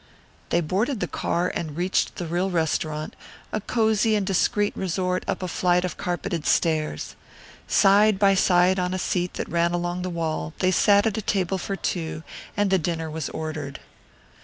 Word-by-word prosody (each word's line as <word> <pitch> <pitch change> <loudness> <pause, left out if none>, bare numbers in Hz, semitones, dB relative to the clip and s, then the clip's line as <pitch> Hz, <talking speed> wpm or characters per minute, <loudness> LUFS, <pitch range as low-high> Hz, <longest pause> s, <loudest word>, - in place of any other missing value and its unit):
They 170 - +2
boarded 205 - -1
the 180 - 0
car 175 +1 -1
and 155 -3 -4
reached 180 +2 0
the 175 - -4
real 175 +3 0
restaurant, 155 -2 -1 0.4
a 215 - -1
cozy 220 0 +2
and 205 -2 0
discreet 205 +2 +1
resort 180 0 -1
up - - -2
a - - -1
flight 180 0 +1
of 180 - -4
carpeted 175 -2 -3
stairs. 155 - 0 0.5
Side 205 +1 +5
by 195 0 +4
side 185 0 +4
on 180 0 -1
a - - -1
seat 180 -1 -1
that - - -3
ran 170 +1 +1
along 175 +1 -2
the 185 - -3
wall 160 -2 -3
they 185 - +2
sat 205 +2 +4
at 220 -1 0
a - - -3
table 190 -2 0
for 195 - -3
two 160 -4 -3 0.3
and 205 -1 +2
the 190 - +4
dinner 165 -1 -2
was 155 -1 -4
ordered. 155 -3 -5
180 Hz, 180 wpm, -24 LUFS, 165-195 Hz, 0.5 s, Side